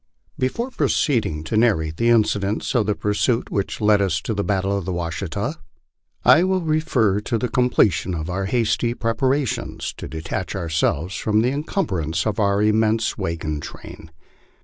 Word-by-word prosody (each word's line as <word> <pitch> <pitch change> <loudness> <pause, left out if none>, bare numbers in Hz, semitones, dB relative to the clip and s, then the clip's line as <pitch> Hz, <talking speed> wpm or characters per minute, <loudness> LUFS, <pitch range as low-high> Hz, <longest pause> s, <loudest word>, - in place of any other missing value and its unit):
XV. - - -32
BEFORE 230 - -1
proceeding 110 - 0
to 80 - -3
narrate 85 -9 +2
the 115 - +2
incidents 105 -3 +1
of 115 -5 +2
the 105 - +1
pursuit 115 +4 0
which 100 -1 -2
led 105 -1 +4
us 90 -5 +1
tc 110 - -3
the 100 - -1
battle 100 0 0
of 100 - -2
the 95 - -3
Washita, 85 0 -3 0.7
I 170 - +7
will 190 0 +1
refer 155 - +1
to 115 +3 -2
the 125 - -1
completion 105 - +2
of 80 -1 -4
our 95 +2 -2
hasty 115 +2 0
preparations 130 +3 -1
to - - -6
detach 80 +3 -4
ourselves 85 -1 -1
from 105 +5 +1
the 125 - +2
encumbrance 95 - -2
of 110 -2 -1
our 100 0 +2
immense 110 +1 +2
wagon 80 -6 -3
train. 80 +2 -10
105 Hz, 165 wpm, -22 LUFS, 90-120 Hz, 0.7 s, I